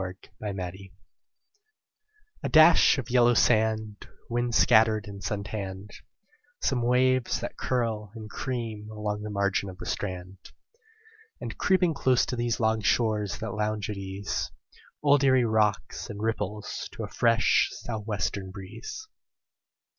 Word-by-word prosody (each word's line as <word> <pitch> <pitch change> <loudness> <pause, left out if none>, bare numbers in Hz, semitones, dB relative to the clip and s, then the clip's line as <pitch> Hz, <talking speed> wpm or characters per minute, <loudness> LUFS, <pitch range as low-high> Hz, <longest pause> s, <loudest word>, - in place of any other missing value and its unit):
ERIE 90 0 -5 0.2
WATERS 95 -2 -5 1.5
A - - -2
dash 155 0 +7
of 130 -3 -5
yellow 120 -1 +5
sand, 110 -3 +1 0.2
Wind 120 0 0
scattered 110 -2 +4
and 100 -1 -9
sun 100 -1 -2
tanned; 100 -1 -6 0.7
Some 130 -4 0
waves 125 +1 +2
that - - -5
curl 115 -5 -2
and 110 -1 -8
cream 110 -3 -4
along 105 -1 -3
the 105 - -5
margin 100 -1 0
of 90 - -10
the - - -8
strand; 95 -1 -4 1.0
And, - - -6
creeping 185 -3 +3
close 130 -3 +2
to 125 - -3
these 120 -1 -1
Long 110 -1 +1
shores 105 -1 +1
that 110 -2 -5
lounge 105 -1 -2
at 105 - -5
ease, 95 +1 -3 0.5
Old 145 -1 +4
Erie 130 -2 +5
rocks 110 -2 0
and 105 - -7
ripples 105 -1 -3
to - - -6
a - - -4
fresh 115 -1 +3
sou' 115 -2 -5
western 100 -2 -3
breeze. 110 - -8
110 Hz, 140 wpm, -27 LUFS, 100-120 Hz, 1.5 s, dash